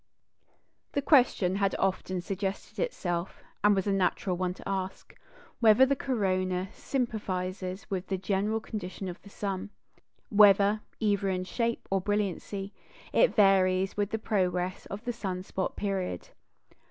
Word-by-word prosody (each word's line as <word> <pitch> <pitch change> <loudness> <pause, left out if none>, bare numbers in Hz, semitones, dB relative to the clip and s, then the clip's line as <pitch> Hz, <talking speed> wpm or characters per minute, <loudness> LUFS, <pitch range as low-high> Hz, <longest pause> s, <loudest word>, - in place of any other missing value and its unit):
The 285 - +1
question 240 - +4
had 195 -1 +1
often 185 -1 -1
suggested 195 +2 -4
itself, 175 - -2 0.2
and 210 0 +6
was 195 - 0
a 200 - +1
natural 185 -1 +1
one 180 0 -2
to - - -10
ask, 190 -1 -4 0.4
whether 230 +2 +7
the 275 +1 +1
corona 185 -7 0
sympathises 190 -6 -3
with 190 -1 -3
the 190 - -1
general 200 +3 0
condition 195 -3 -6
of 180 0 -7
the 200 - -14
sun? 195 -1 -4 0.6
whether, 205 0 +6 0.2
either 200 -2 +1
in 185 -1 -1
shape 230 +4 -2
or 195 -1 +2
brilliancy, 200 0 -2 0.4
it - - +4
varies 190 -2 +4
with 205 -1 0
the 220 - -1
progress 185 -4 -1
of 205 +2 -7
the 245 - -1
sun 185 -5 -4
spot 190 0 -3
period? 190 - -3
195 Hz, 140 wpm, -29 LUFS, 185-210 Hz, 0.6 s, whether